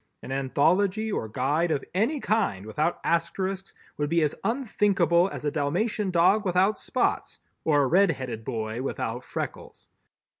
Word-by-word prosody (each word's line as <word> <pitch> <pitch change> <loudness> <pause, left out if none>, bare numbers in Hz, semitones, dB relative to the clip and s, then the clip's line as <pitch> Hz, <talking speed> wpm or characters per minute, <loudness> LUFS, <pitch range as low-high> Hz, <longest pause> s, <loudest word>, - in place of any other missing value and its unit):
An - - -7
anthology 180 +11 +1
or 110 - -2
guide 145 +9 0
of 140 - -1
any 230 - +1
kind 205 - 0
without 150 +10 -1
Asterisks 185 +3 -1 0.2
would 145 -1 -1
be 165 0 +2
as 150 - +1
unthinkable 200 - +2
as - - -7
a 145 - +1
Dalmatian 190 +9 -1
dog 185 +4 +4
without 190 +2 +2
spots - - -1 0.3
or 145 -3 +3
a - - +2
red 190 +7 +4
headed 125 -7 -4
boy 110 +1 -3
without 125 -2 -3
freckles. - - -7
170 Hz, 150 wpm, -26 LUFS, 135-195 Hz, 0.3 s, dog